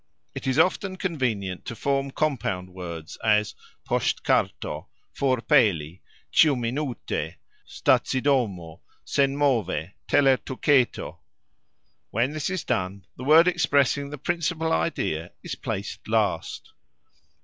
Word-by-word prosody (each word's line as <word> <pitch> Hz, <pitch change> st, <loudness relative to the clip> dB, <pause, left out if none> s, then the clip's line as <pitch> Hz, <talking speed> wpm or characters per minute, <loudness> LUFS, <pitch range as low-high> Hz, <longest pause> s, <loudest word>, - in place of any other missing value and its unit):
It -, -, -6 dB
is 130 Hz, -, +1 dB
often 185 Hz, +1 st, +2 dB
convenient 115 Hz, -, -2 dB
to 115 Hz, -, -5 dB
form 140 Hz, +2 st, 0 dB
compound 110 Hz, -12 st, -2 dB
words, 85 Hz, -3 st, -7 dB
as 105 Hz, -1 st, +3 dB, 0.3 s
"posxtkarto", -, -, 0 dB, 0.3 s
"forpeli", 115 Hz, -, +2 dB, 0.3 s
"cxiuminute", 130 Hz, -2 st, +1 dB, 0.3 s
"stacidomo", 115 Hz, -, +1 dB, 0.3 s
"senmove", 130 Hz, -, +1 dB
"telertuketo". 135 Hz, -1 st, +2 dB, 0.9 s
When 120 Hz, +5 st, 0 dB
this 155 Hz, +1 st, -2 dB
is 185 Hz, -3 st, -2 dB
done, 95 Hz, +1 st, -2 dB
the 125 Hz, -, -8 dB
word 160 Hz, +4 st, +7 dB
expressing 140 Hz, -4 st, +2 dB
the 150 Hz, -, -6 dB
principal 165 Hz, +2 st, -1 dB
idea 80 Hz, 0 st, -1 dB
is -, -, -5 dB
placed -, -, -5 dB
last. -, -, -1 dB
130 Hz, 95 wpm, -25 LUFS, 95-145 Hz, 0.9 s, word